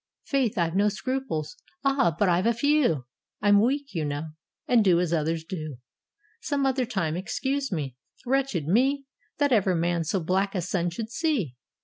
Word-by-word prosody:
"Faith, 265 -6 0
I've 170 -1 +1
no 205 +2 +4
scruples." 235 - -3 0.3
"Ah! 270 - +2
but 205 - +3
I've 180 +4 +2
a 235 - +2
few: 245 - +2 0.3
I'm 205 0 +5
weak, 275 +4 0
you 165 -4 -1
know, 145 +2 -3 0.4
and 240 -3 +5
do 180 -4 +4
as 175 -1 0
others 160 0 0
do: 155 -5 -6 0.6
Some 285 -10 -1
other 260 -2 +1
time: 170 -9 -1
excuse 270 +9 -2
me." 140 -8 -3 0.3
Wretched 260 - 0
me! 270 - +2 0.3
That 285 -2 +2
ever 195 -6 +3
man 170 0 +1
so 175 +5 0
black 190 +4 0
a 185 - 0
sun 175 0 -1
should 220 +6 -6
see 250 - -1
200 Hz, 170 wpm, -26 LUFS, 165-265 Hz, 0.6 s, I'm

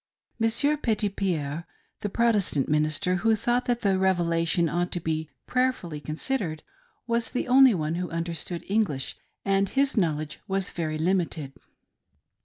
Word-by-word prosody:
Monsieur 260 +7 +2
Petitpierre, 190 - -1 0.3
the 205 - -3
Protestant 205 - +2
minister, 155 +5 +1
who 225 +4 +3
thought 240 +3 0
that 240 -1 0
the 195 -2 +2
Revelation 170 -2 +2
ought 175 +3 -1
to 175 - -1
be 160 -1 -2
" - - -54
prayerfully 250 -12 0
considered," 160 - -3 0.4
was 235 -1 0
the 250 - -2
only 260 -2 +7
one 155 -2 -1
who 180 +1 -2
understood 170 +1 -4
English, 195 -10 0 0.3
and 195 0 +2
his 275 0 +1
knowledge 155 -5 0
was 195 -1 0
very 155 -2 -2
limited. 165 -4 -1
180 Hz, 140 wpm, -26 LUFS, 160-225 Hz, 0.4 s, only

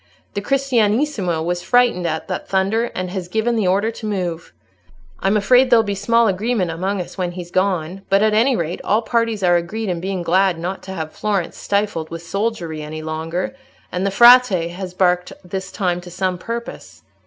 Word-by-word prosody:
The 200 - -2
Cristianissimo 230 - +1
was 175 0 -1
frightened 245 -8 +2
at 160 -1 -3
that - - -4
thunder, 195 +4 +1
and 185 -1 -3
has 185 -2 -4
given 220 +5 0
the 215 -4 +1
order 200 +5 +2
to 225 - -9
move. 180 -5 -3 0.7
I'm 195 +2 +2
afraid 250 +5 +4
there'll 235 -2 +6
be 205 -2 -2
small 230 +4 +2
agreement 195 -2 0
among 190 +4 -2
us 180 +2 -7
when 175 -1 -1
he's 175 -1 -8
gone, 185 -1 0
but, 195 +1 +4
at 215 -1 +3
any 240 +5 +3
rate, 170 -3 -3
all 215 +3 +1
parties 230 -3 0
are 175 -1 +5
agreed 210 +5 -3
in 175 -2 -1
being 185 0 -3
glad 185 +1 +2
not 180 +3 -4
to - - -4
have 160 -3 -5
Florence 200 -5 -2
stifled 200 -6 -1
with 165 0 -7
soldiery 180 -5 -3
any 155 +1 -6
longer, 160 +8 -3 0.4
and 180 +1 -2
the 200 - +1
Frate 215 -5 +6
has 180 0 -7
barked 180 -1 +1
this 190 +1 -5
time 180 -3 -1
to 175 - -11
some 180 0 -2
purpose. 235 +4 -7
190 Hz, 190 wpm, -20 LUFS, 175-220 Hz, 0.7 s, there'll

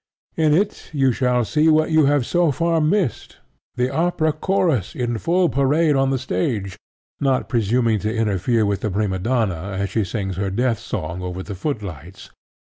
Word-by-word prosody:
In 155 -2 +3
it 200 +4 -1
you 135 -3 +3
shall 125 -1 +1
see 155 +6 +2
what 155 0 +3
you 155 -2 +4
have 145 -3 +2
so 175 0 +2
far 165 +3 +1
missed, 160 - -1 0.4
the 125 +1 0
opera 160 -1 +1
chorus 155 - 0
in 120 -2 -2
full 175 +5 +2
parade 145 +2 +2
on 135 0 +2
the 135 - +1
stage, 100 -5 -2 0.4
not 135 -2 +1
presuming 115 -1 +1
to 105 +2 -2
interfere 110 0 +1
with 100 -1 -1
the 110 - -1
prima 95 -1 -1
donna 100 -4 -1
as 100 -1 -2
she 110 +1 +1
sings 95 -2 -4
her 100 0 -1
death 115 +3 0
song 85 -5 -5
over 90 +1 -5
the 100 - -7
footlights. 95 - -6
120 Hz, 175 wpm, -21 LUFS, 100-150 Hz, 0.4 s, you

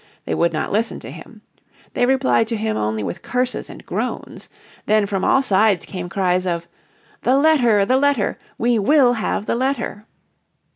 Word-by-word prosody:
They - - -2
would 170 0 +1
not 155 - -3
listen 225 +3 -1
to - - -9
him. - - -13 0.5
They 245 - +1
replied 260 -4 +2
to 230 - -2
him 220 0 -2
only 110 0 -2
with 170 - -5
curses 250 0 -2
and - - -12
groans. - - -5 0.4
Then 215 -1 +3
from 195 -2 -2
all 270 - +3
sides 205 -4 +2
came 180 -2 -6
cries 185 -1 0
of, 170 -1 -2 0.5
"The 260 +2 +3
letter, 250 -9 +4
the 255 +5 +2
letter, 280 -6 +1 0.2
we 235 -1 +1
will 250 +3 +4
have 215 -2 -2
the - - -1
letter." 235 -4 -2
220 Hz, 175 wpm, -20 LUFS, 190-250 Hz, 0.5 s, letter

